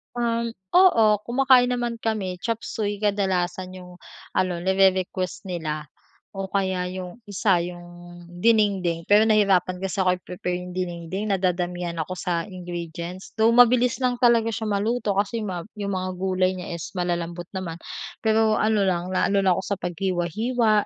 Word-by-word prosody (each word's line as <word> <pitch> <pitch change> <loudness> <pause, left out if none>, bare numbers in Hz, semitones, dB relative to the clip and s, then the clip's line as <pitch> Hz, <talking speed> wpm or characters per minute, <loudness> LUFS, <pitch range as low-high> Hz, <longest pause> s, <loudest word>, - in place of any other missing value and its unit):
Um, 235 -1 -1 0.2
oo 355 -12 +6 0.2
kumakain 255 0 +4
naman 240 -1 -2
kami. 200 -5 -2
Chop 230 +3 -2
Suey 205 -2 -2
kadalasan 185 -3 -1
yung 180 -1 -12 0.3
ano 180 -2 0
nire-request 190 -1 +1
nila 155 -3 -4 0.5
o 195 - -2
kaya 190 -2 -1
yung 185 +2 -7
isa 200 -2 +2
yung 175 0 -8 0.4
dinengdeng 185 -4 +1
pero 210 +2 +6
nahirapan 195 -4 +3
kasi 195 +1 -3
akong 180 -1 +2
i-prepare 180 0 -4
yung 180 - -8
dinengdeng 185 +3 -3
na 195 - 0
dadamihan 175 -1 -1
ako 160 +3 -3
sa 175 -2 -2
ingredients 175 -1 -7
though 220 +1 +5
mabilis 245 +1 +5
lang 250 -2 0
talaga 230 -2 +4
siya 220 0 -3
maluto 205 0 0
kasi 205 +3 0
yung 210 - -3
ma 175 -2 -4
yung 200 -2 -4
mga 185 0 -3
gulay 185 -1 +1
niya 180 -1 -7
is 165 - -8
malalambot 175 -1 -3
naman, 170 -3 -5 0.4
pero 220 0 +3
ano 215 -2 +2
lang 180 -1 0
naano 195 +2 +2
lang 185 -2 +3
ako 190 - -3
sa 200 -2 -2
paghiwa-hiwa 195 +6 0
190 Hz, 155 wpm, -24 LUFS, 180-220 Hz, 0.5 s, oo